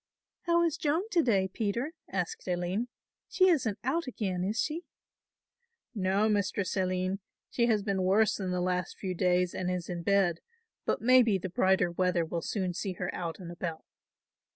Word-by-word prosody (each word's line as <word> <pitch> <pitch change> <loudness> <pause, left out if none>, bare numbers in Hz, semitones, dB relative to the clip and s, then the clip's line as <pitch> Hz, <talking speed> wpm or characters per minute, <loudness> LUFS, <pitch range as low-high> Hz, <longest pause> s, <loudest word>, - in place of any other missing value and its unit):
"How 340 0 +4
is 330 -2 +1
Joan 320 +6 0
to 345 - +4
day, 200 -9 +2
Peter," 225 - -2 0.2
asked 185 -1 -3
Aline, 180 +6 -1 0.4
"she 370 0 +4
isn't 250 - +1
out 280 +5 0
again 190 -7 -2
is 210 +4 -1
she?" 320 +3 -1 1.1
"No, 200 0 +1
Mistress 200 -2 0
Aline, 185 0 0 0.3
she 235 -1 +2
has 215 -3 +2
been 195 -2 0
worse 200 +3 +3
the 180 -2 -2
last 180 0 -1
few 185 -2 -3
days 180 0 +2
and 180 -1 -2
is 180 -2 -3
in 175 -1 -3
bed, 190 -2 +2 0.5
but - - -1
maybe 240 -4 +5
the 185 0 -5
brighter 185 0 +2
weather 180 -1 +1
will 170 +1 -3
soon 185 0 -2
see 190 +1 -3
her 180 0 -4
out 170 -2 -4
and 175 -3 -8
about." 170 -2 -5
190 Hz, 170 wpm, -30 LUFS, 180-225 Hz, 1.1 s, maybe